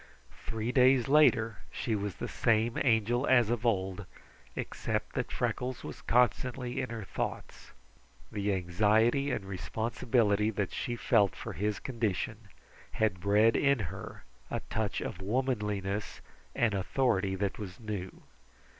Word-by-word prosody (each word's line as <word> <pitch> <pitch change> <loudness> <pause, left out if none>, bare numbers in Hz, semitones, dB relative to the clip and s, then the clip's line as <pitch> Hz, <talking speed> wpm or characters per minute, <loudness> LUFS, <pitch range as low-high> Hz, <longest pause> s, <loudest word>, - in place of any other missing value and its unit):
Three 110 +1 -2
days 130 -1 +5
later 120 -8 +4
she 115 - -2
was 100 -4 -3
the - - -5
same 115 0 +1
Angel 120 +1 +2
as 120 -4 +4
of 120 0 0
old, 95 -2 -1 0.5
except - - -3
that - - -2
Freckles 125 0 -2
was - - -8
constantly 125 +1 +1
in 125 - -4
her 115 -2 -5
thoughts. 95 - -5 0.6
The 105 0 -1
anxiety 105 +9 +2
and 120 -7 -2
responsibility 110 +3 0
that 105 -3 -2
she 120 - -2
felt 100 -3 +3
for - - -6
his 105 +1 -1
condition 110 -3 -3 0.5
had 105 -4 +1
bred 105 +4 +4
in 140 -1 +3 0.2
her - - -9 0.3
a - - -2
touch 110 -3 -1
of 95 - -5
womanliness 105 -3 -2 0.3
and 115 -3 +2
authority 100 -1 +1
that 100 +1 -2
was 95 -3 -7
new. 105 -5 -6
110 Hz, 135 wpm, -31 LUFS, 100-120 Hz, 0.6 s, days